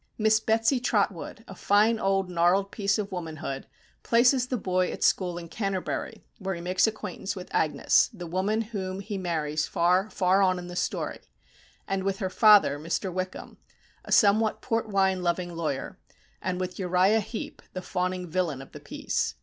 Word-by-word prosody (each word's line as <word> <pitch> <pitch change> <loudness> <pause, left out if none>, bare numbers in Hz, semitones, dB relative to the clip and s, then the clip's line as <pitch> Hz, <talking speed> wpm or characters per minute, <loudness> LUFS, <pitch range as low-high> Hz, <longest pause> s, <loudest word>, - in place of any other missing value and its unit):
Miss 220 0 +4
Betsy 225 +4 +2
Trotwood, 205 -3 -1
a - - -9
fine 210 +4 +3
old 195 -1 +1
gnarled 180 +3 +2
piece 200 0 0
of 205 -1 -3
womanhood, 160 -6 -5 0.3
places 245 +2 +3
the 250 - -1
boy 185 -3 0
at - - -5
school 180 -2 +2
at 170 -1 -8
Canterbury, 195 -3 -3 0.2
where 190 -2 -3
he 170 - -7
makes 180 +4 +2
acquaintance 210 -2 -4
with 185 -1 -8
Agnes, 155 -2 +3
the 185 -7 -8
woman 190 +6 0
whom 195 -4 -4
he 200 -1 -5
marries 155 -4 -1
far, 180 +4 +2
far 190 0 +2
on 185 -1 +3
in 180 - -6
the 175 0 -8
story; - - -2 0.7
and 195 -1 -1
with 195 0 -1
her 190 -1 -3
father, 205 -11 +6
Mr. 170 +4 -3
Wickham, 185 0 -5 0.4
a - - -10
somewhat 215 0 +4
port 225 -1 -2
wine 190 -2 +2
loving 175 0 -1
lawyer; 155 -5 -3 0.4
and 185 0 -2
with 185 +1 -4
Uriah 185 +3 +3
Heep, 220 +2 -6
the 185 - -5
fawning 180 0 -2
villain 160 -6 -1
of - - -17
the - - -10
piece. - - -2
185 Hz, 175 wpm, -27 LUFS, 180-210 Hz, 0.7 s, father